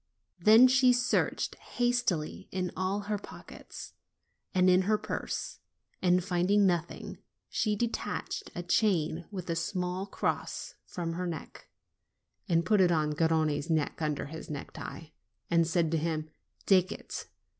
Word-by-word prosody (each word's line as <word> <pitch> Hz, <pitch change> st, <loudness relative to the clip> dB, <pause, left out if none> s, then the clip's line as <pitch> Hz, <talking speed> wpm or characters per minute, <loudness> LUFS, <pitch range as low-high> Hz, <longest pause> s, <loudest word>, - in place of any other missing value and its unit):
Then 220 Hz, +7 st, +8 dB
she 255 Hz, 0 st, +5 dB
searched 245 Hz, 0 st, +1 dB
hastily 240 Hz, -10 st, -1 dB
in 185 Hz, -1 st, -2 dB
all 190 Hz, +2 st, -1 dB
her 205 Hz, 0 st, -2 dB
pockets, -, -, -10 dB, 0.6 s
and 185 Hz, 0 st, +3 dB
in 185 Hz, 0 st, +6 dB
her 215 Hz, -, +4 dB
purse, -, -, -4 dB, 0.4 s
and 180 Hz, 0 st, +3 dB
finding 195 Hz, +2 st, +3 dB
nothing, 175 Hz, -2 st, -1 dB, 0.3 s
she 215 Hz, -1 st, 0 dB
detached 235 Hz, -, -3 dB
a 175 Hz, -, -4 dB
chain 175 Hz, -4 st, +1 dB
with 185 Hz, -4 st, -6 dB
a 170 Hz, -, -1 dB
small 180 Hz, +3 st, -2 dB
cross -, -, -3 dB
from 170 Hz, -2 st, -4 dB
her 180 Hz, +1 st, -3 dB
neck, 165 Hz, -3 st, -7 dB, 0.8 s
and 170 Hz, -1 st, +3 dB
put 210 Hz, 0 st, +4 dB
it 180 Hz, -1 st, +5 dB
on 155 Hz, -2 st, +2 dB
Gar 160 Hz, +2 st, +2 dB
rone's 155 Hz, -1 st, +1 dB
neck, 160 Hz, -1 st, 0 dB
underneath 150 Hz, -1 st, -2 dB
his 160 Hz, -, -8 dB
necktie, 150 Hz, +1 st, -7 dB, 0.4 s
and 165 Hz, -1 st, +4 dB
said 165 Hz, -1 st, +1 dB
to 165 Hz, -, +2 dB
him: 155 Hz, -1 st, -2 dB, 0.3 s
'Take 185 Hz, -2 st, +4 dB
it! -, -, -7 dB
180 Hz, 145 wpm, -30 LUFS, 160-200 Hz, 0.8 s, Then